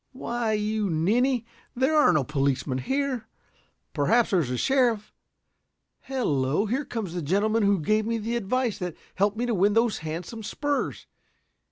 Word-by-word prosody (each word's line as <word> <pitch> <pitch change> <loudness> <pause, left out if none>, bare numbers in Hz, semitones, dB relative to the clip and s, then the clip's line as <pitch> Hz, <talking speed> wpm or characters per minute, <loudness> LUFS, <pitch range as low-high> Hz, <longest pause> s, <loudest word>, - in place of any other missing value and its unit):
"Why, 240 -3 -2
you 210 -1 0
ninny, 230 +10 +1 0.3
there 265 +5 +2
are 300 - +6
no 150 - +2
policemen 135 -1 -1
here. 265 - -2 0.7
Perhaps 230 +11 +2
there 190 - +4
is 145 -7 -1
a 125 - -2
sheriff. 240 - +1 0.9
Hello, 155 - 0
here 260 +7 -1
comes 220 -9 -4
the 175 - -3
gentleman 205 +8 +1
who 200 -2 +3
gave 215 +7 +1
me 230 0 0
the 225 +2 -3
advice 235 +1 -1
that 180 -3 -4 0.2
helped 205 +2 +1
me 240 - 0
to 240 - 0
win 200 +1 +3
those 225 0 +2
handsome 165 +8 -6
spurs. 285 +7 -2
215 Hz, 160 wpm, -26 LUFS, 175-240 Hz, 0.9 s, are